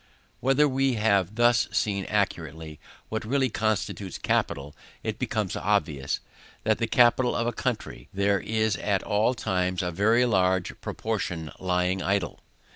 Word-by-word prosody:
When 135 +3 +3
we 135 0 +2
have 100 -3 +2
thus 120 0 +4
seen 100 -2 0
accurately 80 -1 -2 0.3
what 110 - -3
really 130 +2 +1
constitutes 105 -4 -2
capital, 70 +1 -1 0.3
it - - -3
becomes - - -1
obvious, 80 -8 0 0.4
that 110 - +2
of 110 - +2
the 115 - 0
capital 120 +1 +4
of 115 - 0
a 120 - -1
country, 120 - -4
there 100 0 +1
is 110 +1 0
at 100 -2 0
all 110 +5 +1
times 90 -5 -1
a 90 - -1
very 110 +7 +3
large 95 -5 +2
proportion 90 -7 -3
lying 90 0 0
idle. 100 +1 -1
105 Hz, 145 wpm, -26 LUFS, 90-115 Hz, 0.4 s, thus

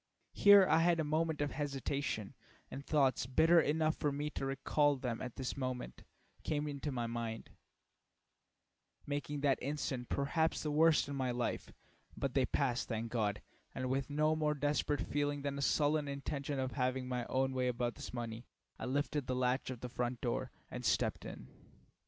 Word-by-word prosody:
Here 205 -1 +8
I 160 - +4
had 170 0 +3
a - - +2
moment 155 0 0
of 145 - 0
hesitation, 140 -6 -2 0.4
and 140 - -6
thoughts 135 -5 +2
bitter 165 +6 +5
enough 155 +1 +1
for 145 - 0
me 145 +2 -3
to 135 - -3
recall 145 +2 +2
them 125 -3 -3
at 125 -2 -5
this 130 -2 -3
moment 130 - -4 0.4
came 150 -1 -1
into 145 0 -3
my 120 -3 -2
mind, 115 -1 -4 1.5
making 145 0 -3
that 140 -2 +2
instant, 135 -3 -3
perhaps, 160 +4 0
the 155 - -1
very 145 - -1
worst 160 -2 +5
in 140 - -4
my 130 -2 0
life; 120 -1 -2 0.5
but 135 -2 -2
they 130 -3 +2
passed, 125 -4 0
thank 115 0 -3
God, 105 -3 -1 0.3
and 130 -1 -2
with 135 +1 -1
no 155 +2 +2
more 150 -1 +1
desperate 145 0 0
feeling 145 -1 -1
than 140 0 -2
a - - -2
sullen 145 +1 +2
intention 140 0 -3
of 130 -1 -1
having 130 -1 -1
my 125 -1 -2
own 130 0 +1
way 130 -1 0
about 120 -1 -1
this - - -8
money, 115 -1 -5 0.3
I - - -4
lifted 145 +1 -1
the 130 - 0
latch 125 +1 0
of 125 -3 -6
the 125 - -4
front 120 -1 -2
door 120 -2 -1 0.2
and - - -5
stepped - - +1
in. 60 - -8
140 Hz, 180 wpm, -35 LUFS, 125-145 Hz, 1.5 s, Here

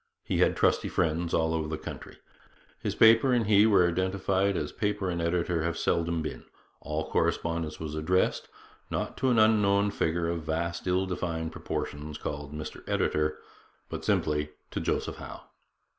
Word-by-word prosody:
He - - -1
had - - +3
trusty - - +2
friends 85 +1 0
all 80 0 +1
over 80 -1 -1
the 80 0 -3
country. - - -9 0.6
His - - -3
paper 115 +3 +6
and 120 -2 +2
he 105 +1 +5
were 95 -5 +5
identified 95 +2 0
as 75 - -3
paper 105 -3 -1
and 85 -1 -2
editor 85 0 0
have 85 +1 -1
seldom 85 -1 0
been. 75 - -5 0.4
All 75 +1 -3
correspondence 80 -2 0
was 80 -1 -5
addressed, 85 +4 +1 0.4
not - - -3
to 130 - +1
an 120 - +3
unknown 105 -2 +4
figure 85 -1 0
of 85 0 -2
vast, 85 +3 -3
ill 90 +1 +2
defined 85 -3 -3
proportions 75 -1 -5
called 75 -1 -5
Mr 75 0 -7
Editor, 75 0 +1 0.5
but - - -5
simply 75 0 +1 0.2
to - - -2
Joseph - - -2
Howe. - - -9
85 Hz, 160 wpm, -28 LUFS, 80-95 Hz, 0.6 s, paper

